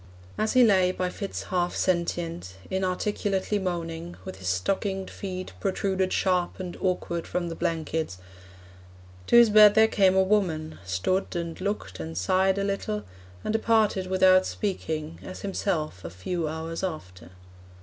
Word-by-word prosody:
As 215 0 0
he 255 - +7
lay, 190 -5 +4
by 185 -1 -2
fits 200 +1 -5
half 175 -1 -1
sentient, 170 - -1 0.2
Inarticulately 190 +2 -1
moaning, 170 -2 -4
With 95 - -7
his 95 0 -7
stockinged 190 - -1
feet 185 -2 -6
protruded 190 -1 0
Sharp 180 -2 +1
and 180 -2 -5
awkward 175 -2 -1
from 175 -1 -2
the 165 - -5
blankets, 160 - -2 1.1
To - - +3
his 235 -2 +8
bed 210 -1 +8
there 220 0 +7
came 190 -3 +3
a 190 - +5
woman, 175 -6 0
Stood 95 - -1
and 170 0 -4
looked 185 - -3
and 80 0 -6
sighed 190 - +2
a 200 - 0
little, 195 - -2 0.4
And - - -1
departed 220 -4 +2
without 185 0 +5
speaking, 160 -6 -3
As 185 - -8
himself 165 - -2
a 80 - -5
few 155 - -3
hours 160 +3 -4
after. 95 - -6
185 Hz, 150 wpm, -26 LUFS, 160-195 Hz, 1.1 s, his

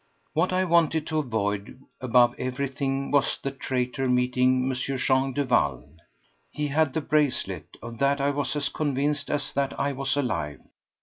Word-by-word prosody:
What 170 +4 +1
I 185 0 +2
wanted 165 -3 +3
to 155 -1 -1
avoid 105 -5 -2 0.2
above 125 -1 +4
everything 135 +1 -2
was 140 -1 +2
the 140 - -3
traitor 130 -1 -2
meeting 125 +1 +2
M. 130 - 0
Jean 130 +1 +1
Duval. 100 - 0 0.6
He 150 -1 -3
had 150 -1 +1
the 160 - +1
bracelet—of 140 -5 -1
that 140 +1 +2
I 140 +1 +2
was 145 +1 -2
as 140 -2 0
convinced 145 0 -1
as 145 -1 -2
that 140 0 -1
I 140 - +1
was 135 +1 -1
alive. 85 - -2
135 Hz, 150 wpm, -26 LUFS, 125-145 Hz, 0.6 s, above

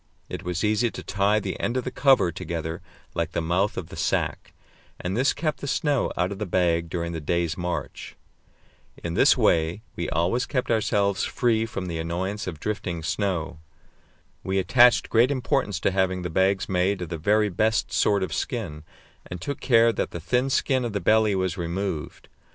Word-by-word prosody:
It - - -5
was 90 -1 -3
easy 110 +3 +2
to - - -8
tie 100 +2 +1
the - - -5
end 120 - -1
of 130 - -1
the 125 - -4
cover 130 -8 +4
together 85 -1 -5 0.3
like - - -2
the - - 0
mouth 90 +5 0
of 80 - -5
the - - -9
sack, - - -1 0.5
and 90 +2 -3
this 130 +4 +3
kept 155 -1 -2
the 140 - -5
snow 145 -1 +1
out 90 +2 +1
of 100 - -6
the 105 - -3
bag 85 -2 +1
during 85 0 -3
the 80 -1 -5
day's 85 +1 0
march. 85 -5 -5 0.9
In 85 - -3
this - - +5
way 85 +6 +2
we - - -3
always 90 - 0
kept 125 -3 -1
ourselves 100 -3 +1
free 115 -3 +1
from 100 -4 -5
the 85 -2 -4
annoyance 95 +6 -3
of 80 -5 -5
drifting 90 -4 -3
snow. 90 -3 -2 0.8
We 95 +1 -1
attached 120 +6 +5
great 120 +3 +4
importance 130 - 0
to - - +2
having 95 -1 0
the 90 - -4
bags 95 +3 +2
made 95 +1 0
of 85 - -7
the 85 -1 -4
very 105 +5 +2
best 110 +5 0
sort 100 -2 +2
of 90 - -3
skin, 95 - -3 0.5
and 90 - -6
took 140 +12 -4
care 115 -2 +4
that - - -2
the 85 - -6
thin 125 +10 0
skin 130 -1 +1
of 120 -3 -3
the 100 - 0
belly 110 +2 +3
was 95 -2 -1
removed. 85 -1 -4
95 Hz, 190 wpm, -25 LUFS, 85-110 Hz, 0.9 s, this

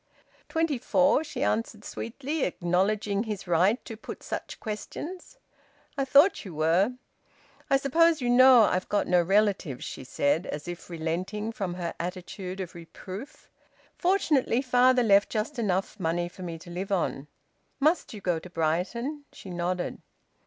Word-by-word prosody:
"Twenty 320 -5 0
four," 280 +4 +3
she 275 -3 -4
answered 215 -3 -1
sweetly, 275 +7 -4
acknowledging 195 +4 0
his 210 -3 -4
right 180 +6 +3
to 225 - -7
put 215 - -9
such - - -5
questions. 310 - -6 0.6
"I 275 -2 0
thought 285 +8 +5
you 185 -7 -9
were." 170 +9 +2 0.8
"I 275 - +5
suppose 320 +4 +3
you 250 - -2
know 250 -1 +8
I've 185 -3 0
got 205 - +1
no 180 -1 +4
relatives," 195 -6 +1
she - - -7
said, 145 +6 0
as 150 +3 -5
if 175 0 -7
relenting 180 +6 -3
from 195 -7 -4
her 175 -2 -3
attitude 180 +1 -5
of 185 -3 -5
reproof. 185 - -10 0.5
"Fortunately, 300 -9 +2
father 250 0 +4
left 200 -2 +5
just 235 +5 -2
enough 195 -1 -1
money 175 0 0
for 180 - -13
me 170 -2 -5
to 175 +2 -12
live 190 +3 -4
on." 160 -6 -1 0.5
"Must 310 +5 +2
you 210 - -8
go 175 -3 0
to 180 - -11
Brighton?" 185 - -2
She 190 - -10
nodded. 175 +1 -2
200 Hz, 150 wpm, -27 LUFS, 175-255 Hz, 0.8 s, know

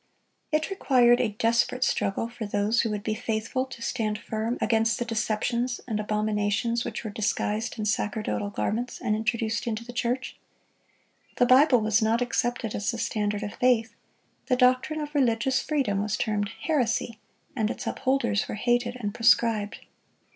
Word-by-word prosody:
It 310 +4 0
required 250 -10 +4
a 215 -4 -1
desperate 235 +3 +2
struggle 200 -2 0
for 235 -2 -6
those 205 +3 +1
who 225 - -1
would 210 -1 -3
be 215 - -1
faithful 225 +4 -2
to 245 -3 -9
stand 215 -4 -1
firm 220 +3 -3
against 225 -1 +2
the 240 - -2
deceptions 235 +2 -1
and 215 -3 -1
abominations 210 +2 0
which 240 - -5
were 215 - -5
disguised 215 +2 -1
in 215 - -3
sacerdotal 210 0 -1
garments 235 +4 -2
and 215 -4 0
introduced 220 +1 -1
into 230 0 -3
the 245 - -9
church. 245 +2 -2 1.0
The 245 - +5
Bible 255 0 +6
was 215 +1 +2
not 220 +2 +2
accepted 240 -2 -1
as 205 - -2
the 235 - -2
standard 210 -2 -1
of 205 - -5
faith. 230 -3 +2 0.5
The 255 - +3
doctrine 255 +5 +2
of 295 0 -6
religious 255 -2 +2
freedom 260 -10 0
was 210 +1 -1
termed 205 -2 -1
heresy, 240 -6 0 0.4
and 220 -4 0
its - - -5
upholders 260 -6 0
were - - -4
hated 240 +2 0
and 205 -3 -3
proscribed. 225 -2 +2
230 Hz, 160 wpm, -26 LUFS, 215-245 Hz, 1.0 s, Bible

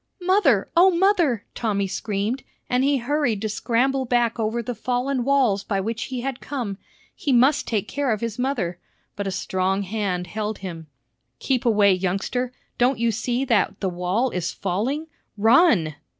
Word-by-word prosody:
"Mother! 350 - +3
O 360 +3 +7
mother!" 345 - +2
Tommy 205 -4 -1
screamed, 205 +5 -2 0.3
and 250 +1 +1
he 280 0 +3
hurried 260 -3 0
to 215 - -1
scramble 260 +5 0
back 240 -1 +1
over 225 +2 -1
the 245 - -3
fallen 250 +2 -1
walls 250 -7 +2
by 200 -2 -1
which 225 +4 -3
he 255 -2 -4
had 265 0 -3
come. 235 -8 -4 0.4
He 285 - -2
must 260 +4 +4
take 215 -4 -1
care 285 -3 -1
of 215 - 0
his 230 0 -4
mother. 220 -10 -1 0.4
But 200 -1 -3
a - - -1
strong 190 +1 -1
hand 190 -3 -2
held 215 +3 -4
him. 170 -4 -7 0.5
"Keep 255 - -1
away, 205 -3 +5
youngster. 195 +7 -1 0.3
Don't 245 +1 +3
you 230 0 +1
see 245 +4 -1
that 205 -5 +1
the 190 - -1
wall 180 +8 0
is 180 -1 -2
falling! 225 - -2 0.3
Run!" 225 - +4
230 Hz, 165 wpm, -23 LUFS, 200-260 Hz, 0.5 s, O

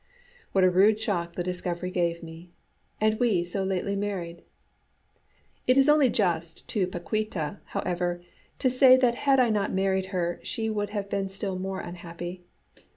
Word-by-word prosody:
What 190 - +3
a 185 - +6
rude 205 +4 +4
shock 175 -6 -2
the 175 - -2
discovery 180 0 -3
gave 170 -2 -1
me! 165 +2 -10 0.5
And 215 0 +2
we 220 -8 +2
so 185 +3 -3
lately 190 +1 -1
married! 185 -4 -4 1.3
It 255 - +4
is 270 +1 +5
only 295 -3 +5
just 170 -7 -1
to 195 -5 +1
Paquíta, 185 -1 -3
however, 175 -1 -2 0.3
to - - +1
say 255 0 +7
that 250 -2 +3
had 270 +2 +2
I 245 -3 +4
not 205 -2 0
married 190 0 0
her 175 -3 -2
she 220 -1 -2
would 205 -1 -2
have 205 -1 -3
been 195 -1 -2
still 195 -1 -4
more 190 0 -3
unhappy. 175 +1 -7
190 Hz, 160 wpm, -27 LUFS, 175-215 Hz, 1.3 s, say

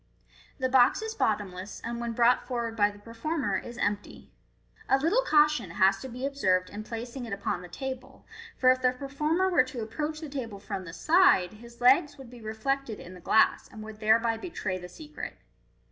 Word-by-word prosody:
The 260 - 0
box 255 - +4
is 445 0 -4
bottomless, 190 - -2
and 235 0 -4
when 235 -1 -3
brought 240 +2 +3
forward 235 -3 -3
by 205 -2 +4
the 205 - -12
performer 230 +1 -2
is 240 0 -9
empty. 205 -3 -3 0.6
A 270 - +5
little 335 - +2
caution 300 - +3
has 195 +1 +4
to 265 - -7
be 250 +2 -5
observed 185 -10 +1
in 210 +1 -6
placing 240 +3 -6
it 220 - -5
upon 200 -2 -2
the 180 - -9
table, 260 +6 -7 0.3
for, 255 -1 +5
if 255 0 0
the 250 0 +3
performer 300 +7 0
were 360 -7 +4
to 255 -3 -5
approach 300 +8 -4
the 315 - -6
table 250 -7 -5
from 195 -1 -6
the 165 - -8
side, 315 - +4
his 235 +2 -14
legs 285 +4 +4
would 265 -3 -12
be 245 -2 -12
reflected 220 +2 -2
in 180 - -10
the 180 - -11
glass, 220 +5 +3
and 215 - -9
would 215 0 -10
thereby 225 +1 +3
betray 205 - -4
the 180 0 -9
secret. 305 - -8
240 Hz, 195 wpm, -28 LUFS, 210-275 Hz, 0.6 s, A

